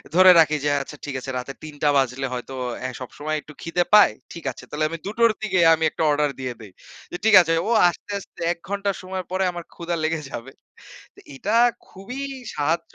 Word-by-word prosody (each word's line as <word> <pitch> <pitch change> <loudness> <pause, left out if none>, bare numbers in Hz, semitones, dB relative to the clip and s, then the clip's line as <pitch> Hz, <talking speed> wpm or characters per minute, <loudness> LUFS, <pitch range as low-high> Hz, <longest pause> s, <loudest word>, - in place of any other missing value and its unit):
ধরে 185 0 +9
রাখি 155 -1 +4
যে - - +3
আচ্ছা 150 +2 -9
ঠিক 145 -2 -5
আছে 130 +1 -6
রাতে 125 +2 -5
৩ 155 -1 -8
টা 150 - +5
বাজলে 135 0 0
হয়তো 125 +2 -6 0.3
অ্যা 130 - -3
সবসময় 150 +4 -4
একটু 150 - -14
খিদে 170 +1 0
পায়। 210 - +8 0.2
ঠিক 170 - -9
আছে। 125 - -13
তাহলে 155 +1 -1
আমি 165 - -5
২ - - -2
টোর 230 -1 +5
দিকে 190 -4 0
আমি 160 0 0
একটা - - -2
অর্ডার 150 0 +2
দিয়ে 130 -1 -3
দেই। 105 -3 -11 0.4
যে, - - -4
ঠিক 220 -2 +6
আছে 165 -1 0
ও - - -1 0.2
আসতে, 190 - -9
আসতে 195 - -14
১ 170 - -20
ঘন্টা 200 0 0
সময় 185 0 -5
পরে 190 +1 0
আমার 175 -1 -7
ক্ষুধা 170 0 -3
লেগে 160 0 0
যাবে। 120 +3 -7 0.6
তো - - -17
এটা 205 +11 -2 0.3
খুবই 240 +8 -8 0.3
সাহায্য 160 +3 -1
160 Hz, 215 wpm, -23 LUFS, 140-185 Hz, 0.6 s, ধরে